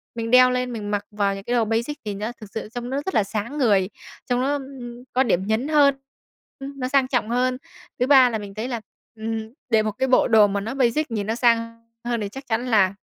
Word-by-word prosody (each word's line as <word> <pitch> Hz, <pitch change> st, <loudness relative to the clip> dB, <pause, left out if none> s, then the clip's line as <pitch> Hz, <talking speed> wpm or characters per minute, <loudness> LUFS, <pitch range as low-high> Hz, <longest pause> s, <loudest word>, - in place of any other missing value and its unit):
Mình 230 Hz, 0 st, -3 dB
đeo 255 Hz, 0 st, +7 dB
lên, 250 Hz, -1 st, -1 dB
mình 210 Hz, -2 st, -5 dB
mặc 205 Hz, 0 st, -1 dB
vào 200 Hz, -1 st, 0 dB
những 195 Hz, -, -8 dB
cái 240 Hz, -, -3 dB
đồ 230 Hz, -, +2 dB
basic 230 Hz, +7 st, -1 dB
thì 210 Hz, -, -3 dB
nó 210 Hz, +4 st, -4 dB
thực 210 Hz, -, -10 dB
sự 220 Hz, -, -5 dB
trông 245 Hz, 0 st, -4 dB
nó 265 Hz, -, -2 dB
rất 380 Hz, -, -3 dB
là 210 Hz, -, +4 dB
sáng 215 Hz, +7 st, -4 dB
người, 200 Hz, -8 st, +3 dB, 0.4 s
trông 245 Hz, 0 st, +1 dB
nó, 275 Hz, +2 st, +1 dB
ừm, 260 Hz, -4 st, -7 dB
có 260 Hz, +1 st, +3 dB
điểm 190 Hz, -5 st, 0 dB
nhấn 220 Hz, +6 st, 0 dB
hơn, 290 Hz, -3 st, +4 dB, 0.6 s
ưm, 275 Hz, 0 st, -8 dB
nó 255 Hz, -, -1 dB
sang 270 Hz, -1 st, +2 dB
trọng 245 Hz, -4 st, -1 dB
hơn. 250 Hz, +1 st, +1 dB, 0.4 s
Thứ 250 Hz, -, +2 dB
ba 265 Hz, -3 st, +7 dB
là 225 Hz, -, -2 dB
mình 205 Hz, -1 st, -8 dB
thấy 220 Hz, +4 st, -4 dB
là, 235 Hz, -3 st, -4 dB, 0.3 s
ừm, 220 Hz, 0 st, -5 dB, 0.2 s
để 220 Hz, -2 st, +4 dB
một 215 Hz, -, -1 dB
cái 265 Hz, +5 st, -1 dB
bộ 255 Hz, -, +4 dB
đồ 220 Hz, -3 st, +6 dB
mà 200 Hz, 0 st, -2 dB
nó 225 Hz, +5 st, -4 dB
basic 270 Hz, +2 st, +1 dB
nhìn 210 Hz, -2 st, -2 dB
nó 225 Hz, -, 0 dB
sang 230 Hz, -1 st, +1 dB, 0.2 s
hơn, 240 Hz, -1 st, -2 dB
thì 200 Hz, -, -3 dB
chắc 270 Hz, +4 st, -10 dB
chắn 240 Hz, +2 st, -1 dB
là 200 Hz, -5 st, +3 dB
235 Hz, 250 wpm, -23 LUFS, 215-255 Hz, 0.6 s, đeo